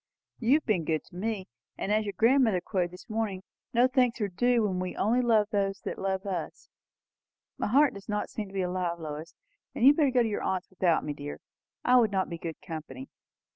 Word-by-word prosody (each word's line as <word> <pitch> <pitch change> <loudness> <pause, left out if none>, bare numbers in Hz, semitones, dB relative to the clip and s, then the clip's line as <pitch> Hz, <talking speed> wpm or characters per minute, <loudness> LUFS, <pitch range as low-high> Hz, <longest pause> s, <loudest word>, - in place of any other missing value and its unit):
"You 245 +4 +4
have 310 - 0
been 195 -7 +1
good 155 0 -1
to - - -18
me. 200 0 -3 0.3
And, 200 - -2
as 215 0 +2
your 200 - -4
grandmother 230 -4 +4
quoted 180 -1 -1
this 180 +1 -13
morning, 215 -4 -2 0.3
no 245 0 +4
thanks 255 -2 +2
are 210 - 0
due 240 +5 +2
when 190 -3 0
we 185 0 -3
only 235 +5 +2
love 220 -4 +3
those 195 -1 0
who - - -3
love 190 0 -2
us. 190 -3 -5 0.9
My - - 0
heart 275 +6 +4
does 200 +1 -11
not 210 0 -1
seem 215 -2 -4
to 195 - -14
be 190 - 0
alive, 180 -1 -1
Lois. 155 +1 -7 0.4
You 235 - +2
had 280 +2 +8
better 295 -4 +4
go 250 -2 +3
to - - 0
your 210 - -2
aunt's 185 0 -2
without 180 -3 +2
me, 150 - -3
dear. 145 0 -7 0.5
I 250 0 +6
should 220 -3 +2
not 190 -1 0
be 170 - -5
good 165 -2 -6
company." 145 -5 -7
200 Hz, 220 wpm, -28 LUFS, 180-230 Hz, 0.9 s, had